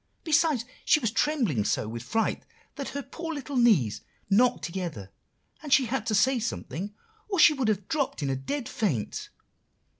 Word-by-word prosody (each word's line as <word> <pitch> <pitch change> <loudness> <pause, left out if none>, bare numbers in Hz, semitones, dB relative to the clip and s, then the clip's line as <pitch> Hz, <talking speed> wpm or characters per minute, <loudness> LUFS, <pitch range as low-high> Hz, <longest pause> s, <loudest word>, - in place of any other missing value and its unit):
Besides, 310 -6 +2 0.2
she - - +4
was 230 -6 -1
trembling 225 - +1
so 105 - 0
with 115 +1 -5
fright, 225 - -1 0.3
that 280 -2 -4
her 280 0 -5
poor 325 +4 -6
little 285 0 -6
knees 205 - +3 0.3
knocked 245 +5 +4
together, 165 - -5 0.5
and 295 -2 -8
she 270 -1 +6
had 230 -2 -2
to 215 - +1
say 250 +5 +3
something 205 -3 -4 0.3
or 390 - -1
she 305 -2 +7
would 265 -5 -1
have 205 -3 0
dropped 280 - -1
in 140 - 0
a - - 0
dead 235 - -4
faint. 150 - -2
230 Hz, 175 wpm, -27 LUFS, 180-280 Hz, 0.5 s, she